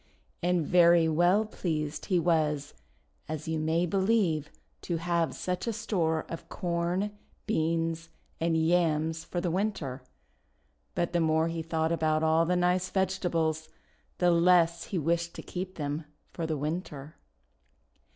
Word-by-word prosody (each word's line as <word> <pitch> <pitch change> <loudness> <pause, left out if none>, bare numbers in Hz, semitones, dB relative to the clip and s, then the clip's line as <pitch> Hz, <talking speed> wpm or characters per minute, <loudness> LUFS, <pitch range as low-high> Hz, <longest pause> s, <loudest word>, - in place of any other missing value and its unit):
And 175 -2 +1
very 170 -1 +5
well 175 +7 +3
pleased 155 -7 -3
he 185 -4 +2
was, 155 -4 +1 0.6
as 155 0 -4
you 160 -1 -1
may 160 +3 +1
be 185 +3 -1
lieve, 190 -7 +2 0.3
to 170 - -2
have 170 -1 0
such 180 +4 -3
a 230 - 0
store 175 -8 -1
of 165 - -8
Corn, 175 +3 -1 0.3
Beans, 165 -3 -1 0.3
and 165 0 +1
Yams 160 -1 +1
for 175 - -4
the 175 -1 -1
Winter. 170 -9 -2 0.9
But 170 0 -1
the 175 - +2
more 160 0 +2
he 165 0 -3
thought 160 0 -1
about 155 -1 +1
all 160 +1 +3
the 180 - +2
nice 180 +1 +1
vegetables, 170 -5 0 0.5
the 180 -1 +3
less 170 -1 +4
he 190 - -3
wished 170 +2 0
to - - -7
keep 185 +1 -5
them 150 0 -3 0.3
for 165 -2 -3
WTinter. 150 -1 -4
165 Hz, 140 wpm, -29 LUFS, 160-180 Hz, 0.9 s, very